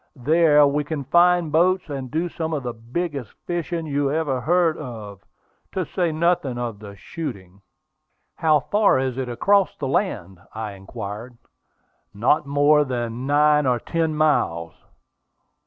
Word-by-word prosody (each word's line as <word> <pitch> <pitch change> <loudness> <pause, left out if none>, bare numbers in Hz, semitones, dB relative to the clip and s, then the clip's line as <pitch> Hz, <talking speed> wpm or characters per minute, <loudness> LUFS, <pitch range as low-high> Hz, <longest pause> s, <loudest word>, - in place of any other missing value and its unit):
There 150 +2 +4
we 145 +1 +1
can 145 -1 -4
find 175 +3 +3
boats, 180 +4 +2
and 135 -4 -5
do 160 +5 -1
some 160 -1 -4
of 145 -3 -2
the 120 -1 -4
biggest 130 - -5
fishing 170 -1 -3
you 145 -2 0
ever 145 -5 -1
heard 170 +2 +2
of, 105 -8 -8 0.5
to 185 -2 -1
say 175 +1 -1
nothing 155 -5 0
of 120 -4 -4
the 100 -1 -10
shooting." 100 - -8 0.8
"How 155 -3 +3
far 205 +6 +3
is 130 -1 -2
it 130 -2 -3
across 195 +11 +2
the 135 - -3
land?" 100 - -2 0.2
I 110 -1 -4
inquired. 100 +4 -8 0.8
"Not 135 +8 +2
more 145 +1 +4
than 120 -1 -4
nine 150 0 +3
or 125 -1 +2
ten 160 +3 -1
miles." 85 - +1
145 Hz, 145 wpm, -22 LUFS, 120-160 Hz, 0.8 s, There